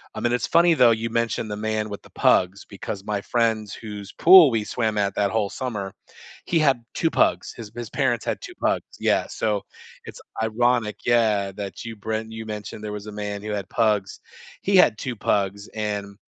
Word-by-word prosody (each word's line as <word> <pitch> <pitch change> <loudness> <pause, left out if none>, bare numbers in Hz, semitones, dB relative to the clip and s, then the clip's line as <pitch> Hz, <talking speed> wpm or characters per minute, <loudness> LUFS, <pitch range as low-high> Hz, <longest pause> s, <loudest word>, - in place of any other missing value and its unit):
I - - -4
mean, 120 0 +1
it's 125 - 0
funny, 170 +1 +5
though, 120 -5 +6
you 115 +1 -1
mentioned 115 -1 -1
the - - -2
man 110 0 -1
with 100 - -7
the - - -16
pugs 95 +2 +2
because 100 0 -7
my 105 -1 -2
friends 110 -3 0
whose 105 -2 -8
pool 175 -5 +8
we 110 -2 0
swam 110 -3 -1
at 100 -1 0
that 100 -1 +1
whole 105 -2 0
summer, 105 -7 -4 0.5
he 170 - +1
had 135 -6 +2
2 165 - +1
pugs. - - +1
His 110 -2 -9
his 120 -2 -6
parents 130 -5 0
had - - -2
2 - - -8
pugs. - - +1 0.2
Yeah, - - +1
so 105 -3 -1 0.4
it's - - -10 0.2
ironic, 115 0 +1
yeah, 110 -5 +2
that 100 +3 -7
you 115 - -6
bren 110 +1 -3
you 110 0 -7
mentioned 105 0 -7
there 105 - -4
was 105 0 -7
a 105 - -6
man 105 -1 -5
who 105 - -4
had 100 -2 -4
pugs. 105 -4 0 0.4
He 200 - +1
had 115 -11 +5
2 125 -2 -4
pugs 100 -1 -1
and 105 -2 -4
110 Hz, 200 wpm, -24 LUFS, 105-115 Hz, 0.5 s, pool